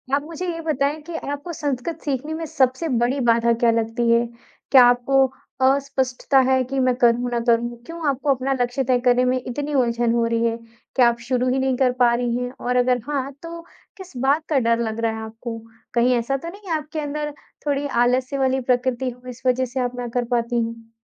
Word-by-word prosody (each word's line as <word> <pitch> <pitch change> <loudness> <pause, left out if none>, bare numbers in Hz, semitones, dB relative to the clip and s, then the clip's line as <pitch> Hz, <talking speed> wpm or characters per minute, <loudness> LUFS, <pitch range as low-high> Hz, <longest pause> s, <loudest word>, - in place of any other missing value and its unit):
आप 285 - -1
मुझे 330 +3 -6
ये 330 - -6
बताइए 300 -1 0
कि 340 - -6 0.2
आपको 290 +4 -5
संस्कृत 295 +2 -3
सीखने 290 +2 -2
में 325 +1 -4
सबसे 285 0 +1 0.2
बड़ी 260 +4 0
बाधा 235 0 +3
क्या 235 - +6
लगती 230 +1 0
है। 235 +1 +4 0.5
क्या 260 -3 +9
आपको 245 +2 +4 0.4
अस्पष्टता 270 0 +2
है 260 0 +3
कि 270 0 -1
मैं 255 -1 +3
करूँ 240 0 +2
ना 240 - 0
करूँ? 235 0 +1
क्यों 330 0 -5
आपको 275 +1 -2
अपना 265 +2 -1
लक्ष्य 245 +2 0
तय 255 -1 +2
करने 250 0 +4
में 255 0 +1
इतनी 285 +4 -4
उलझन 240 -3 +1
हो 235 -1 +2
रही 230 0 +1
है 230 0 0 0.4
कि 260 - +2
आप 235 -1 +3
शुरू 255 0 +1
ही 265 - +1
नहीं 265 -1 +1
कर 255 -1 +3
पा 240 -1 +5
रही 240 0 -1
हैं 245 0 -3
और 250 0 0
अगर 250 0 +2
हाँ 275 -2 -2
तो 335 0 -7 0.4
किस 375 -3 -11
बात 285 +4 +2
का 295 -4 +3
डर 230 -1 +2
लग 225 -1 -2
रहा 230 -1 +1
है 220 - -6
आपको? 225 +1 -7 0.4
कहीं 245 +1 +3
ऐसा 240 +3 0
तो 305 - -8
नहीं 400 +1 -12
है 320 - +2
आपके 305 +1 -6
अंदर 295 0 -3 0.4
थोड़ी 285 0 0
आलस्य 255 +1 +1
वाली 265 0 +1
प्रकृति 250 0 0
हो, 250 0 -11
इस 250 0 -10
वजह 255 +1 +2
से 255 +1 -5
आप 250 0 -1
ना 245 - -3
कर 245 -1 +1
पाती 240 0 0
हैं? 230 0 -9
255 Hz, 220 wpm, -22 LUFS, 240-280 Hz, 0.5 s, क्या